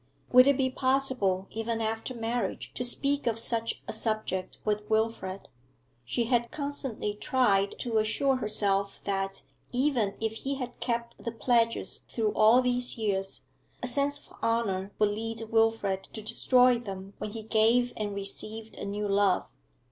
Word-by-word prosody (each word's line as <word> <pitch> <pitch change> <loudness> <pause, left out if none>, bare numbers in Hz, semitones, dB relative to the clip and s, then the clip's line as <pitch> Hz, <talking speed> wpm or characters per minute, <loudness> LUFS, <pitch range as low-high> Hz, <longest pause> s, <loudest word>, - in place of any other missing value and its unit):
Would 255 +1 +8
it 280 -2 +4
be 260 -2 +1
possible, 260 -8 +1
even 225 +1 -2
after 225 +3 -2
marriage, 235 +1 -2
to - - -3
speak 280 +3 +2
of 225 -1 +1
such 230 0 -2
a - - -3
subject 215 -4 -2
with 210 0 -1
Wilfrid? 220 -3 -1 0.6
She 135 - 0
had 235 0 +1
constantly 280 -7 -3
tried 205 -3 +2
to 230 -3 +1
assure 260 +5 +1
herself 200 -3 +1
that, 195 -1 -2 0.3
even 245 -6 +1
if 220 0 -1
he 275 +4 -2
had 250 -2 -6
kept 235 -1 -3
the 235 - -2
pledges 230 0 +1
through 220 -3 0
all 225 +4 +6
these 245 0 +1
years, 195 -3 -2 0.4
a - - 0
sense 280 +3 +1
of 290 - -16
honour 205 -4 0
would 210 -1 +3
lead 225 +1 -4
Wilfrid 225 -4 +2
to 220 - -5
destroy 250 +2 +4
them 195 -3 -7
when 210 - -5
he 225 -1 -6
gave 230 +3 +3
and 205 -2 -3
received 215 +3 -4
a - - -5
new 205 +1 -2
love. 200 -1 +2
225 Hz, 155 wpm, -29 LUFS, 205-245 Hz, 0.6 s, Would